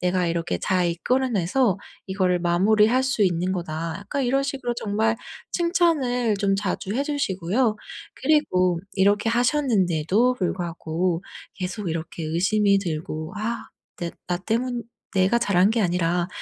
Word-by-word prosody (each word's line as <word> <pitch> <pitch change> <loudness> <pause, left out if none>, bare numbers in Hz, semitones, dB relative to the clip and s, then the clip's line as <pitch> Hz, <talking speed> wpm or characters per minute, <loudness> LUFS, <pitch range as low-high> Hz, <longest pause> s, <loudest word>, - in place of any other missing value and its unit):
내가 180 0 +1
이렇게 170 0 -1
잘 185 -2 +1
이끌어내서 220 +2 +1 0.3
이거를 185 -2 +1
마무리할 210 +8 +3
수 265 -5 +1
있는 180 -1 +1
거다.' 165 -2 -3
약간 270 +7 -2
이런 270 +3 +2
식으로 270 -3 -3
정말 220 0 0 0.4
칭찬을 300 - +2
좀 195 -1 +1
자주 195 -1 -2
해 280 - 0
주시고요. 220 - 0 0.4
그리고 185 - +2
이렇게 205 +3 +3
하셨는데도 230 - +2
불구하고 175 -3 -2 0.3
계속 185 +1 -4
이렇게 165 0 -4
의심이 200 +5 +2
들고 155 -3 -4
'아 225 +3 -3 0.3
내 170 -1 -3 0.2
나 175 - 0
때문 235 +6 -2 0.3
내가 190 +5 +3
잘한 200 -5 +3
게 225 0 +1
아니라 175 -1 +1
195 Hz, 295 characters per minute, -24 LUFS, 175-240 Hz, 0.4 s, 마무리할